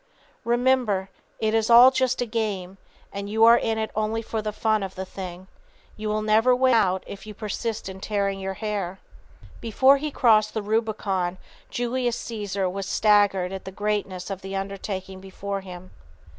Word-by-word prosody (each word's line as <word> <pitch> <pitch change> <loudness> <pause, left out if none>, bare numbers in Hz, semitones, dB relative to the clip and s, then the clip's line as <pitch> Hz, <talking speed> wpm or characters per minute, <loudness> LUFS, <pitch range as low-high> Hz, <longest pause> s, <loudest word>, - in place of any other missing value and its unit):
Remember 240 -5 +1 0.3
it 220 0 0
is 225 0 +1
all 240 +2 +9
just 260 -1 0
a - - -3
game, 200 -5 -3 0.3
and 200 0 -5
you 220 +1 +2
are 230 +1 +8
in 225 0 -1
it 220 0 -2
only 215 +1 -1
for 220 0 -3
the 215 0 -3
fun 215 0 +1
of 190 -1 -5
the 190 0 -5
thing. 185 -1 -8 0.5
You 215 0 -4
will 215 0 -1
never 220 +4 +4
win 255 0 +3
out 190 -5 +2
if 200 +2 -10
you 210 - -8
persist 220 +1 -4
in 190 0 -7
tearing 200 -1 -1
your 190 0 -4
hair. 200 -4 -3 0.6
Before 260 +5 +4
he 300 +2 -3
crossed 220 -6 +3
the 220 - -2
Rubicon 205 -4 -1 0.3
Julius 245 0 -1
Cæsar 205 -4 -3
was 195 0 -5
staggered 200 -3 +3
at 190 - -6
the 190 - -6
greatness 200 -2 -3
of 195 -1 -5
the 195 +1 -6
undertaking 195 -1 -5
before 195 +1 -5
him. 185 -1 -10
210 Hz, 175 wpm, -24 LUFS, 195-225 Hz, 0.6 s, all